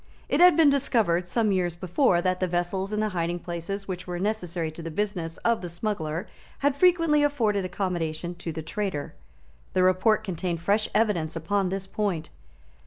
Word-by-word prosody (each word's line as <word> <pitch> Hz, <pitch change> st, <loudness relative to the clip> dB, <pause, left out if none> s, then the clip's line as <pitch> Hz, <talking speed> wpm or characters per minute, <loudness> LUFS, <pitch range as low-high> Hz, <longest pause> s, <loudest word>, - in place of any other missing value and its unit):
It 280 Hz, -, +1 dB
had 360 Hz, 0 st, +7 dB
been 310 Hz, -4 st, +6 dB
discovered, 220 Hz, -11 st, +1 dB
some 215 Hz, +2 st, +1 dB
years 180 Hz, -3 st, 0 dB
before, 175 Hz, -, +2 dB
that 185 Hz, -1 st, +1 dB
the 185 Hz, -, +1 dB
vessels 180 Hz, +3 st, -1 dB
and 210 Hz, 0 st, 0 dB
the 215 Hz, -, 0 dB
hiding 175 Hz, -2 st, -1 dB
places 175 Hz, +3 st, -5 dB
which 185 Hz, -1 st, -5 dB
were 175 Hz, -1 st, -3 dB
necessary 180 Hz, -5 st, -2 dB
to 160 Hz, -, -9 dB
the 165 Hz, -, -5 dB
business 175 Hz, -2 st, -3 dB
of 235 Hz, -1 st, +2 dB
the 175 Hz, -, -5 dB
smuggler 170 Hz, -2 st, -3 dB, 0.4 s
had 285 Hz, -1 st, +3 dB
frequently 330 Hz, -2 st, +4 dB
afforded 225 Hz, -10 st, +1 dB
accommodation 175 Hz, -3 st, -2 dB
to 170 Hz, -1 st, -6 dB
the 160 Hz, 0 st, -5 dB
traitor. 185 Hz, -4 st, -3 dB, 0.6 s
The 185 Hz, -, +3 dB
report 185 Hz, +4 st, +3 dB
contained 180 Hz, -3 st, -3 dB
fresh 205 Hz, +5 st, +1 dB
evidence 185 Hz, -8 st, +1 dB
upon 185 Hz, +4 st, 0 dB
this 195 Hz, 0 st, -3 dB
point. 195 Hz, -5 st, -2 dB
185 Hz, 175 wpm, -26 LUFS, 170-215 Hz, 0.6 s, had